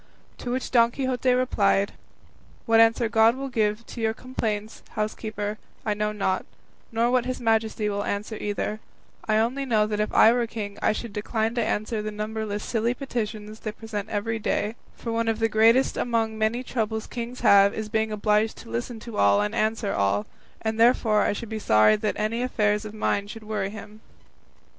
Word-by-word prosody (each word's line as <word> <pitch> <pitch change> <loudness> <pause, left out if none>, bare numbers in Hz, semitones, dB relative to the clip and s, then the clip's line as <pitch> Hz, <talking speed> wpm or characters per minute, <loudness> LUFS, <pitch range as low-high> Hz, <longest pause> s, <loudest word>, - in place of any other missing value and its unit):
To 245 - -5
which 255 +1 -2
Don 235 -2 +5
Quixote 255 0 0
replied, 205 -6 +2 0.7
"What 225 0 +4
answer 225 +1 +4
God 225 +1 +4
will 270 +1 -5
give 215 -1 0
to 235 - -8
your 220 0 +1
complaints, 220 -4 -4
housekeeper, 215 -1 -3 0.3
I 215 - +1
know 210 0 -1
not, 195 -3 -1 0.5
nor 230 +1 +1
what 250 -1 +2
his 255 - -3
Majesty 220 -2 +1
will 205 0 -1
answer 205 +2 -3
either; 210 +1 -3 0.5
I 215 -1 +3
only 240 +5 +1
know 220 -5 +2
that 210 0 -2
if 210 - 0
I 225 - +6
were 240 -1 0
king 205 -3 -6
I - - +3
should 220 0 -5
decline 220 +2 -1
to 235 -1 0
answer 215 0 -1
the 215 - -3
numberless 215 0 -4
silly 235 +1 0
petitions 215 -5 -4
they 215 - -4
present 215 -2 -6
every 225 +2 -2
day; 210 0 -1 0.2
for 230 - -5
one 230 0 0
of 225 -1 +1
the 225 0 +2
greatest 225 +4 +4
among 230 -2 0
the 220 - -9
many 220 +3 0
troubles 220 -3 -2
kings 240 +1 -6
have 200 -3 +6
is 220 -1 -3
being 220 0 0
obliged 210 +1 +1
to 230 - -12
listen 235 0 -3
to 235 -1 -7
all 100 0 +4
and 105 - -2
answer 215 -1 0
all, 100 +1 +1 0.4
and 220 0 -1
therefore 225 -3 +4
I - - +2
should 230 +3 -6
be 220 -1 -3
sorry 110 - +5
that 210 0 -1
any 220 +3 -1
affairs 210 -4 +1
of 215 0 -8
mine 205 -1 0
should 220 +1 -9
worry 210 -2 -2
him." 215 +1 -10
220 Hz, 195 wpm, -25 LUFS, 210-230 Hz, 0.7 s, I